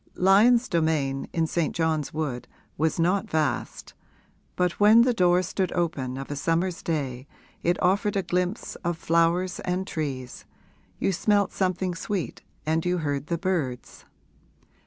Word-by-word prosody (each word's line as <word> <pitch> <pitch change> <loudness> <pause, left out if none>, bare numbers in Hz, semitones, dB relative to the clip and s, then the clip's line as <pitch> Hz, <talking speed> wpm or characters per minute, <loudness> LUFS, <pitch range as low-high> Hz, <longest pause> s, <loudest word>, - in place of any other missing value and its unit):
Lyon's 220 +6 +5
domain, 155 -5 0
in 165 -1 +1
St. 165 0 -1
John's 160 -3 0
Wood, 145 -6 -3 0.3
was 160 +2 0
not 195 +5 +1
vast, 155 - -2 0.6
but 180 -1 0
when 215 +3 +7
the 250 0 +2
door 180 -3 +3
stood 185 0 -2
open 135 -7 -2
of 135 +1 -6
a - - -2
summer's 165 +5 -1
day 135 -5 -3 0.3
it 175 +1 +1
offered 200 +3 +2
a 195 - +1
glimpse 180 +4 -2
of 170 -1 -3
flowers 170 +3 +1
and 180 +1 -2
trees, 135 -8 -5 0.5
you - - 0
smelt 205 +2 +2
something 185 -1 -1
sweet 180 +2 -4 0.2
and 160 +1 +1
you 180 0 0
heard 145 -3 -2
the 170 - -1
birds. 160 -10 -3
170 Hz, 145 wpm, -26 LUFS, 155-185 Hz, 0.6 s, when